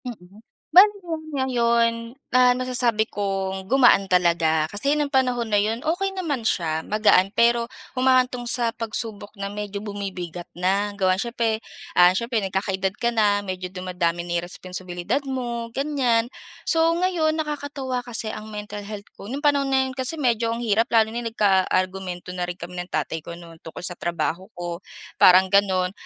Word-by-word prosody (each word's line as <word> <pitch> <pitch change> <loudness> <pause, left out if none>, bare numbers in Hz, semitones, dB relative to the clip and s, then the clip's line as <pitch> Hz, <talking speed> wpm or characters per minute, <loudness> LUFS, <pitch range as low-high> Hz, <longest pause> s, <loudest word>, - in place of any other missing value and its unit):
Mm. 205 -4 -10 0.3
Bale 370 +5 +9 0.5
ngayon, 235 -2 +1 0.2
ah, 250 0 +5
nasasabi 245 -3 +1
kong 195 -1 -3
gumaan 245 -5 +5
talaga 170 -4 +2
kasi 275 +9 0
ng 295 -1 -1
panahon 250 -3 +1
na 205 - +4
'yon 220 +4 -1
okey 385 +5 -1
naman 290 -11 -2
siya 160 -5 0
magaan 210 -3 +4
pero 235 0 +3 0.3
humahantong 255 -1 +2
sa 235 -1 0
pagsubok 220 -2 -5
na 200 0 -5
medyo 205 0 -5
bumibigat 185 -4 -6
na, 195 +3 0
gawa 185 -1 +2
siyempre, 230 -1 -1 0.3
ah, 180 +1 +6
siyempre 235 +2 0
nagkakaedad 190 0 -1
ka 235 +2 0
na 205 -3 +2
medyo 185 -2 -4
dumadami 180 -2 -2
na 175 0 -1
yung 175 - -6
responsibilidad 180 +5 -4
mo 240 -3 -3
gan'yan. 260 -5 +1 0.3
So, 325 -1 +2
ngayon 340 -3 +1
nakakatuwa 285 -4 -3
kasi 225 -2 -3
ang 215 0 -8
mental 210 -1 -7
health 205 -1 -8
ko - - -9
nung 275 +6 -5
panahon 285 -2 +3
na 265 0 +3
yun 260 - -4
kasi 260 +4 -1
medyo 235 -5 0
ang 235 - -5
hirap 225 +1 +2
lalo 220 -3 +3
na 235 - -3
yun 235 - -4
nagkaargumento 185 -2 0
na 180 -1 -3
rin 175 - -4
kami 180 0 -8
ng 180 - -5
tatay 155 +1 -2
ko 170 +2 -9
no'n 170 -1 -13
tungkol 165 +2 -10
sa 175 -1 -4
trabaho 175 +1 -2
ko 175 -1 -5 0.4
parang 185 +1 +7
gano'n 190 -2 +3
210 Hz, 165 wpm, -23 LUFS, 185-245 Hz, 0.5 s, Bale